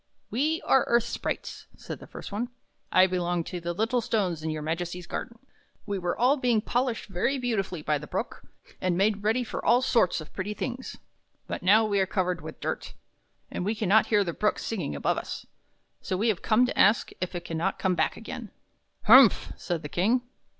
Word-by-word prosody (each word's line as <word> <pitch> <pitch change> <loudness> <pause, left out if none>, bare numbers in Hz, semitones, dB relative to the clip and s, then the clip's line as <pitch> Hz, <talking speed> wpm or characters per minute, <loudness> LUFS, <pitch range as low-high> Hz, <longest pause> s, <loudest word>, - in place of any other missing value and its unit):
" - - -45
We 305 +8 0
are 265 - +4
earth 235 -1 +4
sprites," 235 - -4
said - - -7
the - - -12
first - - -9
one. 225 +5 -2 0.2
" - - -46
I 185 - +6
belong 175 -2 -1
to 180 +2 -5
the 170 +1 -2
little 225 +7 0
stones 190 -8 -1
in 160 - -3
your 155 -1 -3
Majesty's 175 +2 -3
garden. 235 +6 -5 0.5
We 200 -1 -2
were 175 -1 -2
all 255 +6 +4
being 245 -4 +2
polished 245 +2 -1
very 200 +8 0
beautifully 195 -10 -2
by 150 -1 +1
the 150 - -9
Brook, - - -4 0.4
and 180 -2 +1
made 200 +1 +2
ready 225 +4 +1
for - - -5
all 245 +2 +4
sorts 230 -10 +2
of 155 - -10
pretty 205 +2 -4
things. 255 +2 -5 0.5
But - - -5
now 215 +4 +5
we 205 -2 +1
are 190 - +2
covered 180 -1 -1
with - - -9
dirt, - - -4 0.6
and - - -3
we 210 +4 0
can 210 -3 -2
not 220 +2 +5
hear 210 -2 +3
the 170 -3 -3
Brook 210 +4 +1
singing 180 - -3
above 70 - 0
us; - - -7 0.6
so 185 - -2
we 225 +4 +2
have 205 - 0
come 230 +3 +4
to - - -3
ask 210 +3 +4
if 185 0 -3
it 175 - -5
can 165 - -4
not 190 +3 0
come 190 -2 +1
back - - 0
again." - - -7 0.5
"Humph!" 240 0 +7
said 175 -3 -3
the - - -4
King. 220 +11 +1
200 Hz, 215 wpm, -27 LUFS, 175-235 Hz, 0.6 s, Humph